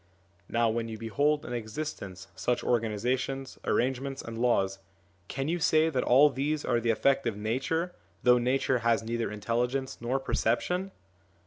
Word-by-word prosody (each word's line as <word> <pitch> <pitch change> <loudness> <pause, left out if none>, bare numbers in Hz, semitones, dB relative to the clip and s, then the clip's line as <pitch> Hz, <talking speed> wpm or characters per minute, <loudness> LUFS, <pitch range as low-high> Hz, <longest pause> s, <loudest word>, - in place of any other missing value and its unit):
Now, 120 0 +2
when 115 +1 -1
you 110 -1 -6
behold 145 +7 +1
in 120 - -5
existence 110 -5 -5
such 105 +6 0
organisa 115 +2 +1
tions, 135 0 -5
arrangements, 135 +2 -1
and 115 - -7
laws, 100 -5 +1 0.5
can 135 +1 -3
you 175 +2 0
say 160 0 +3
that 130 - 0
all 145 +4 +6
these 145 +3 -1
are 120 -2 +2
the 115 0 -1
effect 135 +4 +2
of 110 -3 -2
Nature, 135 +11 -1 0.3
though 125 0 +6
Nature 130 +1 +1
has 115 0 +2
neither 115 0 -2
intelligence 120 +5 -1
nor 125 +3 0
perception 180 +10 0
125 Hz, 155 wpm, -29 LUFS, 115-135 Hz, 0.5 s, all